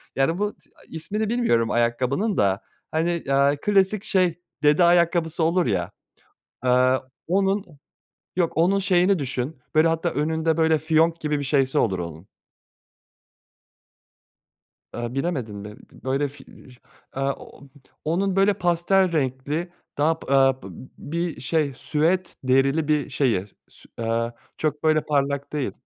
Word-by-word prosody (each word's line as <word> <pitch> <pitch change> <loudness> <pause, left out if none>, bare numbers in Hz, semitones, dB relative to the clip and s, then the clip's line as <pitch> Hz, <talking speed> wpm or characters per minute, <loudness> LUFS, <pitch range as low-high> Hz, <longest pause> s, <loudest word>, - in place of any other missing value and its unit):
Yani 165 +7 +1
bu, 210 0 -1
t - - -33
aaa, - - -21
ismini 205 +7 -3
bilmiyorum 170 - +1
ayakkabının 125 - 0
da, 100 +1 +2 0.3
hani, 170 +1 0
aaa, 140 +1 +3
klasik 200 0 +2
şey, 185 -5 +1 0.2
dede 150 +4 +5
ayakkabısı 170 -1 +3
olur 170 +2 +2
ya, 95 -3 -1 0.7
aaa, 130 +1 +3 0.3
onun, 195 +3 +1 0.7
yok 175 -2 +1
onun 180 +5 +3
şeyini 185 -1 +3
düşün, 130 +2 -3 0.2
böyle 155 +1 +5
hatta 165 +1 0
önünde 160 +2 0
böyle 160 -1 +3
fiyonk 160 +1 +2
gibi 150 -1 -1
bir - - -3
şeyi 135 -1 +1
olur 95 -5 +1
onun. 85 +1 -7 2.7
Aaa, 120 0 -4
bilemedin 135 -8 -2
mi? 105 +1 -8
B - - -19
böyle 135 +2 0
fi 140 0 -13
eee, 125 - -16 0.4
aaa, 135 +1 -1
ooo, 140 - -14 0.4
onun 185 +4 0
böyle 195 +1 +4
pastel 175 +1 +2
renkli, 145 +3 -2 0.3
daha 160 +3 +2
p - - -7
aaa, 135 -1 +4
p - - -10
b - - -10 0.3
bir 170 +1 -4
şey 150 0 0
süet 170 +7 0
derili 135 +4 +2
bir 150 -2 +1
şeyi. 115 -9 0
S - - -29 0.2
sü - - -19
aaa, 115 +1 -1 0.3
çok 150 -1 -2
böyle 155 -1 +3
parlak 140 -1 -1
değil. 145 -3 -1
155 Hz, 145 wpm, -24 LUFS, 130-175 Hz, 2.7 s, dede